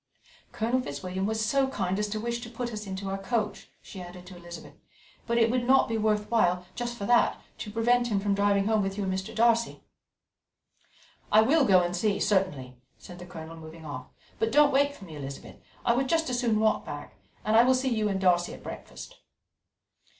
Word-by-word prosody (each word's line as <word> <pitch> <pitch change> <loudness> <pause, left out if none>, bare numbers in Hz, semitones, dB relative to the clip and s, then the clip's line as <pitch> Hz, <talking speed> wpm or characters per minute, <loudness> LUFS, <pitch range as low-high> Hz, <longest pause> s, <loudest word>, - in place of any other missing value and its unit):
Colonel 235 +4 0
Fitzwilliam 185 - -4
was 220 0 -1
so 270 +4 +2
kind 190 -7 -2
as 210 - 0
to 215 +1 -3
wish 235 +2 -2
to 235 - -8
put 240 0 -5
us 210 -1 -6
into 190 +1 -5
our 195 0 -3
coach," 210 0 -2
she 190 - -9
added 180 0 -10
to 185 0 -11
Elizabeth, 175 0 -10 0.5
"but 235 0 +1
it 230 -1 +4
would 250 -1 +1
not 265 +2 +4
be 225 - -2
worth 215 -1 0
while, 180 -6 +2
just 240 -1 -4
for 200 - -4
that, 240 +2 +3 0.2
to - - -5
prevent 240 +3 +2
him 210 -4 0
from 200 0 0
driving 200 0 +2
home 220 0 +2
with 195 0 -3
you 205 - -1
and 190 -1 -1
Mr. 190 0 -4
Darcy." 230 +1 +2 1.5
"I 215 +1 +7
will 285 +4 +4
go 185 -5 +5
and 175 0 -2
see, 200 +2 0
certainly," 145 -11 0 0.2
said 175 0 -12
the 180 - -9
Colonel, 165 -2 -9
moving 160 0 -11
off; 130 -4 -7 0.3
"but 225 0 +1
don't 295 0 +5
wait 285 +1 +3
for 195 - -12
me, 160 -4 -10
Elizabeth. 140 -1 -8 0.3
I 235 - +4
would 260 +2 0
just 325 -5 +1
as 245 - 0
soon 230 -4 +1
walk 220 0 +2
back, 145 -7 -8 0.3
and 215 +1 +2
I 230 - +8
will 260 +1 +4
see 260 +1 0
you 215 -2 0
and 195 -1 -1
Darcy 175 -2 +2
at - - -15
breakfast." - - -9
210 Hz, 215 wpm, -28 LUFS, 185-235 Hz, 1.5 s, I